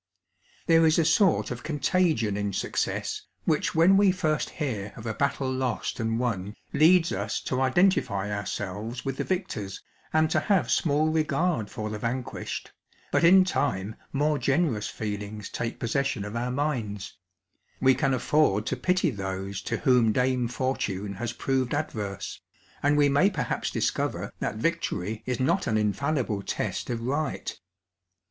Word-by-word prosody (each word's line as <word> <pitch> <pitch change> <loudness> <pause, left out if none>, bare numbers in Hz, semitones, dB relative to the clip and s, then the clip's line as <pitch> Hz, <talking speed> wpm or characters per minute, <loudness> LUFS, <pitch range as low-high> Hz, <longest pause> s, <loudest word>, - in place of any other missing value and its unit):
There 165 -1 +5
is 155 - +3
a 165 - +3
sort 170 +3 +3
of - - -5
contagion 155 - +1
in 100 -1 -2
success, - - -2 0.2
which - - +1
when 175 +4 +6
we 200 -1 +5
first 160 -5 0
hear 110 -10 -4
of 115 - -10
a 110 - -2
battle 140 0 0
lost 130 -1 -2
and 115 0 0
won 105 -4 -2 0.2
leads 170 +2 +5
us 100 +3 -2
to 130 0 -1
identify 130 - +2
ourselves 105 +4 -4
with 135 -1 -2
the - - -1
victors, 175 - -3 0.3
and 155 0 +3
to - - +3
have 200 -3 +1
small 155 0 +2
regard 160 - 0
for 105 0 -5
the 105 - -4
vanquished, 120 +3 -4 0.4
bat - - +2
in 185 +3 +8
time 110 - -1 0.2
more 150 +1 +1
generous 135 -7 +1
feelings 105 -1 -5
take 115 -1 -4
possession 125 -3 -1
of 105 +2 -6
our 120 +1 -1
minds; 120 - -2 0.6
we 130 0 +5
can 135 0 +1
afford 120 -6 +2
to - - -1
pity 180 -3 +1
those 95 -2 -4
to - - -2
whom 125 -4 +4
Dame 125 +1 +1
Fortune 105 -6 -2
has 115 +4 -3
proved 130 0 -1
adverse; 105 -10 -4 0.4
and 145 +1 +3
we 145 -1 +5
may 145 +8 +4
perhaps 180 -7 -2
discover - - -1
that - - -2
victory 110 - -2
is 125 -2 -1
not 170 +9 +1
an 110 - +2
infallible 110 0 0
test - - -3
of 115 -2 -2
right. 140 +4 -2
130 Hz, 155 wpm, -27 LUFS, 105-155 Hz, 0.6 s, in